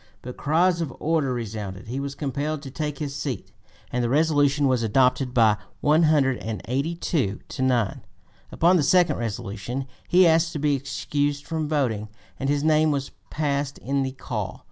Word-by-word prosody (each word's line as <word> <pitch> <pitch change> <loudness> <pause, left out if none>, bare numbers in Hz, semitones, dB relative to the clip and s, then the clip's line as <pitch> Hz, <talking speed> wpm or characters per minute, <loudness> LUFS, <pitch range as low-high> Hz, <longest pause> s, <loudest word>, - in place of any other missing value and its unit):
But 125 0 -7
cries 170 +3 +2
of 155 -5 -2
"order" 155 -4 +1
resounded; 110 -3 -5
he 125 +4 -3
was 140 0 -4
compelled 145 +1 -3
to 135 - -8
take 150 0 -3
his 140 -1 -4
seat 125 -10 -4 0.4
and 125 0 0
the 120 - 0
resolution 145 -1 +3
was 130 -2 +2
adopted 125 +3 +2
by 110 -4 +4 0.2
182 140 - +1
to - - -6
9. 120 -6 +1 0.5
Upon 175 +3 +4
the - - +2
second 170 +1 +3
resolution 115 +3 -4 0.2
he 185 +1 +6
asked 165 0 +3
to - - -3
be 145 0 +2
excused 145 +1 -2
from 160 -2 -2
voting, 115 -9 0 0.3
and 135 - -1
his 145 0 +1
name 155 0 +4
was 140 -2 -2 0.2
passed 140 -2 -1
in 140 +1 -1
the 130 -1 -2
call. 130 - -5
140 Hz, 165 wpm, -24 LUFS, 125-155 Hz, 0.5 s, he